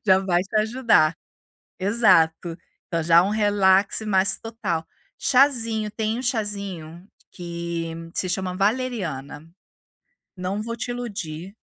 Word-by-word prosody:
já 190 0 +6
vai 180 -2 +1
te 200 +3 -13
ajudar. 220 -8 +3 0.6
Exato, 175 -5 +3 0.3
então 165 -1 -1
já 170 +1 +6
um 195 - 0
relaxe 205 0 +3
mais 195 -1 +2
total. 215 -8 -3 0.3
Chazinho, 230 -6 +2
tem 220 +1 -2
um 255 - -4
chazinho 200 -7 -4 0.2
que 170 -1 -5 0.2
se 185 - -1
chama 185 -1 -2
valeriana. 195 - -2 0.9
Não 185 +3 -3
vou 230 +2 -4
te 240 +1 -4
iludir, 195 -7 -6
195 Hz, 120 wpm, -23 LUFS, 170-220 Hz, 0.9 s, já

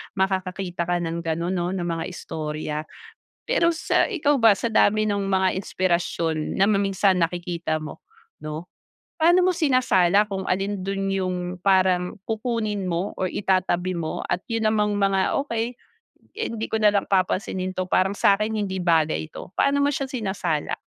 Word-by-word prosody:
makakakita 185 -2 -1
ka 175 - +1
ng 165 +1 -3
ganon 170 +1 -2
no 175 -1 -1
na 180 - -2
mga 165 -1 -2
istorya. 155 -3 -5 0.7
Pero 335 0 +2
sa - - +1
ikaw 295 - +1
ba 225 -3 +6
sa 230 +3 -3
dami 215 0 +4
ng 200 -2 -1
mga 190 -1 +2
inspirasyon 170 -4 -1
na 195 - +3
ma 205 -1 +2
minsan 195 -1 +2
nakikita 170 -1 -1
mo 155 - -8 0.4
no, 155 +3 -7 0.5
Paano 345 +3 +6
mo 370 - +3
sinasala 220 - +3
kung 195 -2 -4
alin 195 +1 -1
dun 195 +1 -2
yung 190 -2 -1 0.3
parang 185 -2 +2
kukunin 215 -4 -2
mo 175 +4 -2
or 185 -1 -2
itatabi 185 -2 0
mo 165 -2 -3
at 175 +1 -1
yun 225 -1 0
namang 210 -1 +1
mga 195 -1 +2
okey, 230 0 -3 0.6
hindi 230 - -3
ko - - -1
nalang 210 -2 +2
papansinin 185 0 0
to 185 0 -3
parang 185 +2 +2
sakin 205 +2 +2
hindi 205 -3 -2
bagay 160 -2 +1
ito? - - -9
Paano 280 0 +2
mo 285 - +3
siya 275 -1 -1
sinasala? 190 - -2
190 Hz, 160 wpm, -24 LUFS, 175-215 Hz, 0.7 s, ba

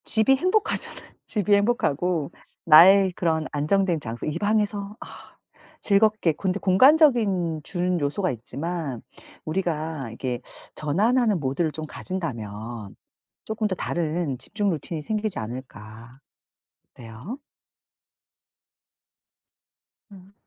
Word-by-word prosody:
집이 220 +4 +4
행복하잖아요. 370 +8 -1
집이 210 -2 0
행복하고 180 - +1 0.3
나의 185 +5 +8
그런 160 -3 0
안정된 170 +4 +1
장소 115 -3 -6
이 150 - -2
방에서 205 -1 -1
아 - - -12 0.4
즐겁게 210 -4 +3
근데 190 +5 -2
공간적인 200 - +4
주는 180 +1 -1
요소가 160 +6 -1
있지만 140 +2 -5 0.4
우리가 155 -5 -2
이렇게 120 +2 -4 0.3
전환하는 210 - +2
모드를 150 +4 -1
좀 155 +1 -6
가진다면 115 - -5 0.5
쪼끔 220 0 -2
더 190 - -2
다른 165 -5 -2
집중 205 - -2
루틴이 160 -1 -4
생기지 215 +4 -2
않을까? 115 +1 -9 0.7
어때요? 120 - -9 2.7
음. 195 0 -15
175 Hz, 245 characters per minute, -24 LUFS, 140-205 Hz, 2.7 s, 나의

